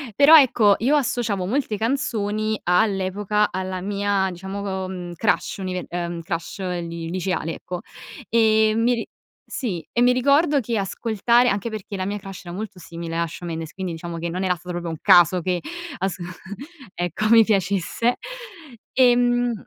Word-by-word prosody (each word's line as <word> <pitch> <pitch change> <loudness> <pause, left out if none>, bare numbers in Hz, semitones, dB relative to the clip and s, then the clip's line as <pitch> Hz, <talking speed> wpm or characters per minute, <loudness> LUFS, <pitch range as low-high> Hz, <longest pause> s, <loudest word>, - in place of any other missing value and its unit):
però 295 +6 +9
ecco, 225 -7 +4
io 265 +7 +2
associavo 230 -8 0
molte 230 +1 -1
canzoni 215 -3 -1
all'epoca 200 +2 +1
alla 185 0 -3
mia 200 0 0
diciamo, 190 +1 -4
uhm 180 -2 -6
crush 205 +5 0
unive 185 -2 -4
ehm 170 -1 -4
crush 170 +3 -5
li 170 -3 -4
liceale, 180 -2 -2
ecco. 180 0 -6 0.5
E 220 -1 +4
mi 235 +2 +3
ri 230 - -3 0.4
sì, 185 - -4
e 240 - 0
mi 245 +1 +6
ricordo 280 +4 +3
che 235 -2 -3
ascoltare 225 +4 +2
anche 200 +2 -1
perché 215 -2 -6
la 185 -1 -2
mia 205 +1 -2
crush 195 -1 -10
era 175 0 -7
molto 205 -1 -6
simile 165 0 -7
a 170 0 0
Shawn 170 +2 -7
Mendes, 160 -1 -5
quindi 190 -2 -4
diciamo 170 +1 -6
che 170 +1 -3
non 180 +3 -3
era 185 -1 +1
stato 180 +1 -9
proprio 175 -1 -4
un 160 - -5
caso 175 +1 +6
che 180 0 -1 0.4
asc 190 0 -2 0.8
ecco, 175 +5 -1
mi 230 0 +8
piacesse 200 +3 0 0.8
ehm, 245 -1 +3
195 Hz, 160 wpm, -23 LUFS, 180-225 Hz, 0.8 s, però